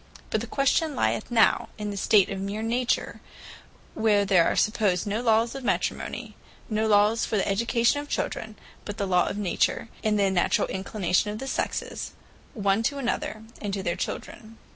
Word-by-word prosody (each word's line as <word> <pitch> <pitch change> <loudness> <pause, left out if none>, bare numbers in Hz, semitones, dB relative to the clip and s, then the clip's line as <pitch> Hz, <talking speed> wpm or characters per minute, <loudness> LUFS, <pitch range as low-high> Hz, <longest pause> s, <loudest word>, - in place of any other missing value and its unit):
But - - +1
the - - -5
question 285 +2 +1
lyeth - - 0
now 230 -2 +3
in 210 -1 -4
the - - -5
state 200 0 +4
of 195 -1 -4
meer 205 +3 -3
Nature; 240 +2 -1 0.7
where 210 -2 +2
there 185 -4 +4
are - - +1
supposed 205 -5 +1
no 210 +3 -1
lawes 230 0 +2
of 270 -1 -7
Matrimony; - - -2 0.4
no 215 +1 +1
lawes 210 +2 +4
for 215 - 0
the 195 - 0
Education 235 +6 +2
of 290 - -11
Children; 220 -1 -3 0.3
but 205 0 -6
the 200 - -1
Law 180 -2 +2
of - - -3
Nature, 205 +3 0
and 215 -1 +2
the 200 -1 +2
naturall 180 -2 +2
inclination 190 0 0
of 210 - -4
the 265 - -6
Sexes, 270 - -3 0.4
one 200 -1 +1
to 280 +5 -1
another, 235 -4 -3 0.2
and 205 -1 -2
to 195 - -4
their 175 -2 -1
children. 220 +1 -6
215 Hz, 185 wpm, -26 LUFS, 200-230 Hz, 0.7 s, state